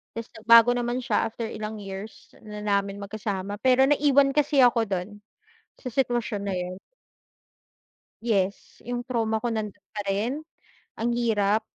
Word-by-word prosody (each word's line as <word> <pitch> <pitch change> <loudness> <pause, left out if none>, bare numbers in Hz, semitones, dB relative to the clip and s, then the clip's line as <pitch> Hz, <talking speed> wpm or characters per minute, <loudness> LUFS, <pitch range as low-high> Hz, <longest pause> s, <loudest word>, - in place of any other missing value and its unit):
Tapos 230 0 -5
nagbago 230 +1 +6
naman 240 +1 -1
siya 250 - 0
after 230 0 -5
ilang 215 0 -5
years 195 +2 -9
na 210 -1 -8
namin 200 -1 -1
magkasama 200 -1 -4
pero 260 +1 +5
naiwan 280 -1 +4
kasi 295 -1 +2
ako 240 -2 +5
dun 200 +2 -4 0.5
sa 255 - -7
sitwasyon 240 -5 0
na 190 - -1
'yon. 180 0 -4 1.5
Yes, 200 -4 -1
yung 245 0 -3
trauma 225 -3 -1
ko 240 - -1
nandun 210 -3 -4 0.2
pa 205 - -3
rin, 230 +10 -1 0.5
ang 235 +1 0
hirap, 220 -3 +2
220 Hz, 145 wpm, -26 LUFS, 205-245 Hz, 1.5 s, nagbago